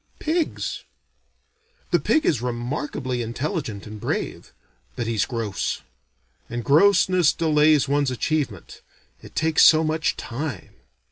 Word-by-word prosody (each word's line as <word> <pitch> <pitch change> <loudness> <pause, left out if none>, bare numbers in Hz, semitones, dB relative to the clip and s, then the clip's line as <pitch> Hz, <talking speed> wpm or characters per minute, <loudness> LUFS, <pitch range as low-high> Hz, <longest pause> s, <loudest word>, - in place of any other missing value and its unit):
Pigs? 320 +1 -2 1.1
The - - +4
pig 310 - +1
is 130 -8 +1
remarkably 125 +1 -3
intelligent 120 - -4
and 105 0 -9
brave, - - -4 0.4
but 120 - -3
he's 110 -3 0
gross; 115 -6 -3 0.7
and 120 0 -4
grossness 180 - +4
delays 150 -3 +3
one's 140 0 +1
achievement, 130 - -3 0.4
it - - -14
takes 160 0 +2
so 160 0 +7
much 155 0 0
time. 130 - -5
140 Hz, 115 wpm, -23 LUFS, 120-160 Hz, 1.1 s, so